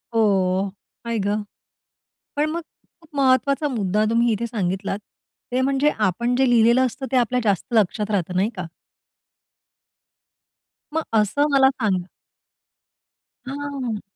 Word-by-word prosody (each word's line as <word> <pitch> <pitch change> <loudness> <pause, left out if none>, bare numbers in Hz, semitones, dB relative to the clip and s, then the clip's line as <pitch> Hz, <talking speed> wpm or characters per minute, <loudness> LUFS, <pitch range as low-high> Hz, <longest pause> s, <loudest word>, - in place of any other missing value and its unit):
हो. 195 -3 +2 0.4
आई 230 -1 -1
गं! 205 +1 -1 0.9
पण 300 +1 +1
मग 335 +2 -2 0.4
खूप 325 - -21
महत्त्वाचा 275 +2 +2
मुद्दा 210 -4 0
तुम्ही 235 0 +3
इथे 230 +2 -2
सांगितलात, 195 -2 -2 0.5
ते 255 - +1
म्हणजे, 275 +2 +2
आपण 235 +5 +1
जे 265 -1 +3
लिहिलेलं 235 +2 +5
असतं, 265 +2 -5
ते - - +3
आपल्या 250 0 +2
जास्त 200 -5 +1
लक्षात 210 0 +1
राहतं. 180 -3 -1
नाही 195 +4 +2
का? 180 - -4 2.3
मग 320 0 0 0.2
असं 250 +8 +2
मला 270 -1 +6
सांग 215 -9 0 1.5
हां. 270 -5 -4
230 Hz, 125 wpm, -22 LUFS, 205-265 Hz, 2.3 s, मला